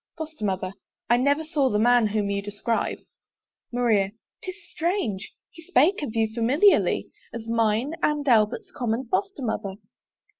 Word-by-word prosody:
FOSTER 315 -6 -7
MOTHER. 185 -1 -1 0.4
I 240 - +6
never 285 +5 +2
saw 300 -4 +1
the 210 - +1
man 240 +1 +4
whom 205 -1 -1
you 200 0 -1
describe. 205 +3 -2 0.7
MARIA. 220 -5 +2 0.3
'Tis 370 -1 -6 0.2
strange! 315 - -2 0.2
he 330 - -13
spake 340 +1 +3
of 240 -6 -4
you 225 -1 +2
familiarly 270 - +3 0.2
As 230 -1 -7
mine 230 +4 +1
and 295 -1 0
Albert's 240 - +2
common 240 +1 -1
Foster 390 -5 -1
mother. 210 -4 -3
240 Hz, 145 wpm, -25 LUFS, 215-300 Hz, 0.7 s, I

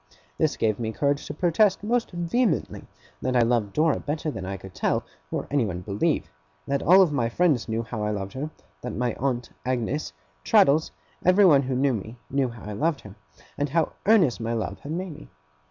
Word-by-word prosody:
This - - +1
gave 110 -1 +1
me 110 -1 -2
courage 140 +4 0
to - - -5
protest 185 +5 +2
most 235 +2 0
vehemently 180 +7 -1 0.4
that 130 0 -1
I 120 - +5
loved 115 -4 +1
Dora 155 0 +2
better 155 +1 -3
than 95 -8 -6
I 95 0 -4
could 95 -1 -12
tell, - - 0 0.3
or - - -3
anyone 110 -11 0
believe; 105 - -1 0.3
that 140 0 -1
all 185 +3 +7
my 135 -8 0
friends 145 -4 +1
knew 115 +1 -1
how 115 -2 -5
I 105 - 0
loved 100 -2 -4
her; 145 +4 -4 0.3
that - - -5
my 120 0 0
aunt, 125 -3 -1
Agnes, 130 - -2 0.3
Traddles, 145 - +4 0.3
everyone 185 -6 +6
who 130 -1 -2
knew 135 +1 +2
me, 110 +2 -6
knew 135 -1 +1
how 115 -1 -11
I 105 - -6
loved 150 +6 0
her, 100 - -11 0.5
and 145 0 0
how 165 +2 +1 0.2
earnest 185 - +4
my 115 +1 -2
love 100 -4 -3
had 145 - -8
made 180 +1 -3
me. 155 - -13
135 Hz, 195 wpm, -25 LUFS, 115-160 Hz, 0.5 s, all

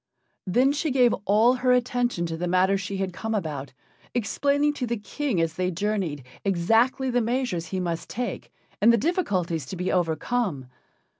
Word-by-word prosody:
Then 250 +9 +3
she 300 +2 -1
gave 250 -3 +4
all 220 +5 +5
her 255 0 +1
attention 245 -6 0
to 165 -1 -3
the 175 +2 -3
matter 185 +2 +3
she 195 0 -3
had 190 -1 -2
come 220 +4 -3
about, 145 -8 -4 0.4
explaining 285 +6 +1
to 255 -4 -3
the 235 0 -1
King 220 - -2
as 165 -1 0
they 180 +2 -1
journeyed 185 -7 -2 0.2
exactly 225 +8 +2
the 245 0 +2
measures 230 -8 -1
he 185 +3 -3
must 170 -2 -3
take 245 +1 -4 0.3
and 225 +3 +7
the 235 - +4
difficulties 185 - -1
to 190 - -6
be 180 +1 -2
overcome. 175 - 0
205 Hz, 170 wpm, -25 LUFS, 175-245 Hz, 0.4 s, and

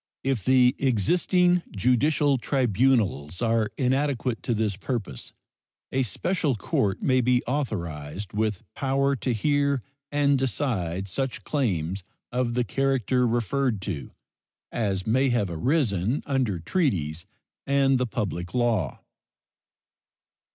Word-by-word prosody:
If 130 -7 0
the 130 -1 +4
existing 175 - +2
judicial 135 +5 +2
tribunals 115 - +1
are 115 -2 +1
inadequate 130 -2 0
to 120 - -1
this 105 -2 0
purpose, 100 - -4 0.6
a 135 - +1
special 145 - 0
court 100 -1 -1
may 130 -1 +3
be 125 0 +2
authorized, 95 - -3
with 105 -2 -1
power 140 +1 +1
to 125 - -1
hear 140 +2 +1 0.3
and 145 -1 +3
decide 100 - -1
such 130 +7 -3
claims 95 - -1 0.3
of 120 -1 -1
the 125 - +2
character 130 0 +1
referred 120 0 0
to 80 -10 -4 0.6
as 100 -5 -1
may 130 +5 +2
have 105 -7 0
arisen 115 - 0
under 130 -9 0
treaties 85 - -1 0.4
and 135 -1 +3
the 125 - 0
public 90 -4 -3
law. 115 - 0
120 Hz, 115 wpm, -26 LUFS, 100-135 Hz, 0.6 s, the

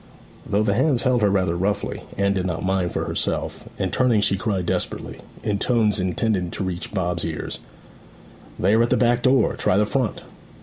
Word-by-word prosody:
Though 105 +2 +1
the 100 -2 +2
hands 130 +2 +2
held 125 -2 +2
her 105 - +4
rather 95 -3 +1
roughly, 100 +4 -1 0.2
Anne 100 0 +2
did 95 -1 -1
not 85 0 -3
mind 95 -2 0
for - - -2
herself, - - -3
and - - -2
turning 125 -4 +3
she 100 - +2
cried 95 -2 -1
desperately, - - -3 0.2
in 100 -1 -1
tones 110 -4 +2
intended 95 -1 0
to - - -2
reach 90 -2 -4
Bob's 90 -4 -1
ears: 80 -2 -4 1.0
'They 95 +3 +2
are 110 - +5
at 120 - +2
the - - +3
back 120 0 +3
door; 130 +2 +3
try 90 - +2
the 105 - +3
front!' 115 0 -1
100 Hz, 190 wpm, -23 LUFS, 95-115 Hz, 1.0 s, are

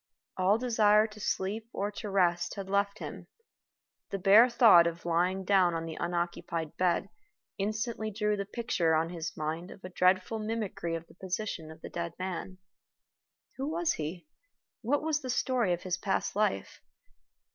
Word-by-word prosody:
All 190 +3 +3
desire 220 -3 +4
to 215 -1 -10
sleep 210 +3 -2
or 205 +1 -2
to 210 0 -6
rest 175 -3 +1
had 195 -2 -6
left 200 +1 0
him. - - -8 0.8
The 195 - -2
bare 205 +6 +7
thought 220 -8 +7
of 170 0 -5
lying 180 +3 +1
down 185 -3 +4
on 165 0 -3
the 160 -1 -6
unoccupied 170 -2 -3
bed 180 +1 +1 0.5
instantly 215 +2 -2
drew 210 0 0
the 200 -1 -3
picture 200 -8 0
on 165 +2 0
his 165 -2 -5
mind 160 +4 -3
of 195 - -13
a 185 - -6
dreadful 185 +4 +2
mimicry 215 -6 -3
of 165 0 -6
the - - -19
position 185 -3 -4
of 160 0 -12
the - - -7
dead 170 -1 -4
man. 185 0 -5 1.0
Who 270 +2 -2
was 335 +1 0
he? 160 +3 -5 0.6
What 280 +6 0
was 310 -1 0
the 260 - -6
story 245 -5 +1
of 175 0 -1
his 185 0 -2
past 195 -1 -1
life? 200 - -1
190 Hz, 170 wpm, -30 LUFS, 170-215 Hz, 1.0 s, bare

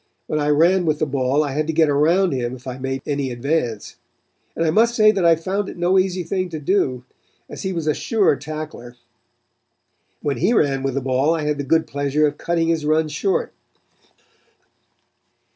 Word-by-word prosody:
When 155 - -2
I 145 0 0
ran 170 +4 +3
with 155 -1 +1
the 155 - 0
ball 135 +1 0
I 145 - -3
had 150 +3 -1
to 160 - -1
get 160 0 +3
around 165 +6 +2
him 125 -1 -2
if 125 - -15
I 130 0 -6
made 135 0 -4
any 140 -2 -2
advance, 120 -3 -3 0.6
and 165 - 0
I 160 - +2
must 230 +6 +3
say 215 -1 +6
that 195 -3 -1
I 170 -1 +6
found 190 +5 -3
it - - -10
no 180 +2 +3
easy 185 -1 -1
thing 185 +2 -2
to 160 -2 -5
do, 140 -6 0 0.4
as - - -9
he 190 - -2
was 165 -4 -3
a 155 - +2
sure 210 -5 +1
tackler. 155 -2 -7
And 120 - -14 1.3
when 145 -2 -1
he 195 +8 +2
ran 140 - +2
with 135 -1 -2
the 140 - -1
ball 135 +5 +1
I 160 - -3
had 150 -1 -1
the - - -1
good 160 +4 +2
pleasure 145 +2 0
of 145 -1 -2
cutting 165 -1 0
his 165 -2 0
runs 155 +1 +1
short. 190 +6 -1
155 Hz, 205 wpm, -21 LUFS, 140-170 Hz, 1.3 s, say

